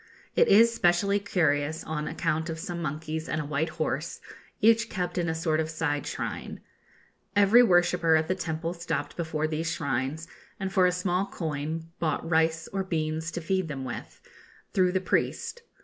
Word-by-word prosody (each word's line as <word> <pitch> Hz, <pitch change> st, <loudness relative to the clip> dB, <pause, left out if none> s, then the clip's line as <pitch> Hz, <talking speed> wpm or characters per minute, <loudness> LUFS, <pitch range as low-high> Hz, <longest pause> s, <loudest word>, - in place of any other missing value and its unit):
It -, -, +5 dB
is 230 Hz, +3 st, +6 dB
specially 200 Hz, 0 st, +3 dB
curious 155 Hz, -5 st, 0 dB
on 155 Hz, -1 st, -3 dB
account 160 Hz, 0 st, -1 dB
of 160 Hz, -, -3 dB
some 170 Hz, 0 st, -5 dB
monkeys 155 Hz, +1 st, -4 dB
and 155 Hz, -, -1 dB
a 150 Hz, -, -3 dB
white 150 Hz, +2 st, -1 dB
horse, -, -, -3 dB, 0.4 s
each 230 Hz, +1 st, +4 dB
kept 180 Hz, -1 st, -3 dB
in 170 Hz, -1 st, 0 dB
a 160 Hz, -, -1 dB
sort 160 Hz, -1 st, 0 dB
of 160 Hz, 0 st, -1 dB
side 155 Hz, -3 st, -1 dB
shrine. -, -, -4 dB, 0.8 s
Every 205 Hz, +4 st, +7 dB
worshipper 175 Hz, -5 st, +4 dB
at 160 Hz, 0 st, +2 dB
the 185 Hz, -, +2 dB
temple 165 Hz, -1 st, -3 dB
stopped 170 Hz, 0 st, -3 dB
before 160 Hz, -2 st, -2 dB
these 160 Hz, +1 st, -1 dB
shrines, 140 Hz, +3 st, -2 dB, 0.3 s
and 195 Hz, -1 st, -3 dB
for 185 Hz, -2 st, +5 dB
a -, -, +2 dB
small 180 Hz, +1 st, 0 dB
coin 160 Hz, +1 st, -4 dB
bought 160 Hz, 0 st, -1 dB
rice 160 Hz, 0 st, +2 dB
or 195 Hz, -1 st, 0 dB
beans 160 Hz, -2 st, -2 dB
to 175 Hz, -, -3 dB
feed 185 Hz, +1 st, 0 dB
them 135 Hz, -3 st, -5 dB
with, 120 Hz, -, -7 dB, 0.5 s
through 185 Hz, -1 st, +3 dB
the 185 Hz, -, +1 dB
priest. 475 Hz, -, -1 dB
165 Hz, 175 wpm, -28 LUFS, 155-180 Hz, 0.8 s, Every